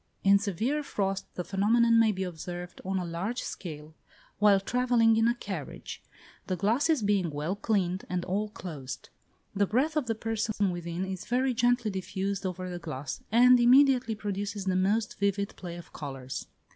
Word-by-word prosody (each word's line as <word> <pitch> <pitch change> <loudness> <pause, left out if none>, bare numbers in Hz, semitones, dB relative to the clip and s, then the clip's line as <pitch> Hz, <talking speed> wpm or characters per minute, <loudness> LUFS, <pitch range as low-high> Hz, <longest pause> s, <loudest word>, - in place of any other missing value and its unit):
In 200 0 +6
severe 220 - -1
frost 195 -8 -2
the 180 - -3
phenomenon 230 +5 +3
may 225 -1 +5
be 190 -1 -3
observed 175 0 -6
on 190 +1 -1
a 180 - -2
large 185 +9 -3
scale 155 -3 -7 0.5
while 205 -2 +6
travelling 235 +1 +3
in 225 +1 +3
a 235 - +2
carriage; 190 - -6 0.5
the 185 - 0
glasses 235 - +2
being 200 -4 +2
well 150 +5 -2
cleaned, 190 -4 0
and 180 -1 -2
all 205 +3 -1
closed. 150 -10 -7 0.5
The 200 0 +2
breath 275 +10 +1
of 300 -6 0
the 225 - 0
persons 225 0 -2
within 175 -2 -1
is 190 -1 -5
very 255 +2 +1
gently 245 -2 +2
diffused 190 +1 -3
over 185 0 -5
the 175 -1 -5
glass, 145 -5 -5
and 250 +2 +7
immediately 250 -1 +5
produces 205 -1 -4
the 185 -1 +1
most 205 +4 +1
vivid 200 0 0
play 175 -2 -7
of 175 - -11
colours. 135 -3 -6
200 Hz, 170 wpm, -29 LUFS, 180-230 Hz, 0.5 s, and